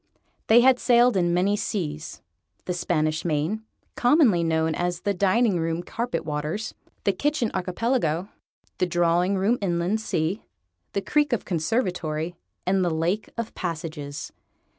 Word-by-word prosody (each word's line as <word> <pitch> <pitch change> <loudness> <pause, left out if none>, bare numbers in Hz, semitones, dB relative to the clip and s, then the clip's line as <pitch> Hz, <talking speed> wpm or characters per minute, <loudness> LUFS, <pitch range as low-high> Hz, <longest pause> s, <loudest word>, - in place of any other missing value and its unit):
They 230 +2 +7
had 255 0 +5
sailed 240 -1 +4
in 175 -2 +2
many 185 +4 +2
seas: 160 -7 -4 0.4
the 180 - -1
Spanish 155 -3 0
Main 165 +6 -1 0.3
commonly 245 - +4
known 160 -1 +1
as 175 +1 -2
the 200 - 0
Dining 200 +1 +2
room 165 +1 -1
Carpetwaters 190 -4 -3 0.3
the 200 - +3
Kitchen 290 +2 0
Archipelago, 185 -2 0 0.5
the 180 - +2
Drawing 175 +2 +2
room 210 +6 +2
Inland 180 +3 0
Sea, 175 0 -1 0.5
the 200 - -1
Creek 295 +4 +2
of 235 - -1
Conservatory, 170 -3 -1 0.3
and 190 +1 +2
the 175 - +2
Lake 170 +6 -1
of 230 -1 -4
Passages. 155 -4 -5
180 Hz, 135 wpm, -25 LUFS, 165-220 Hz, 0.5 s, They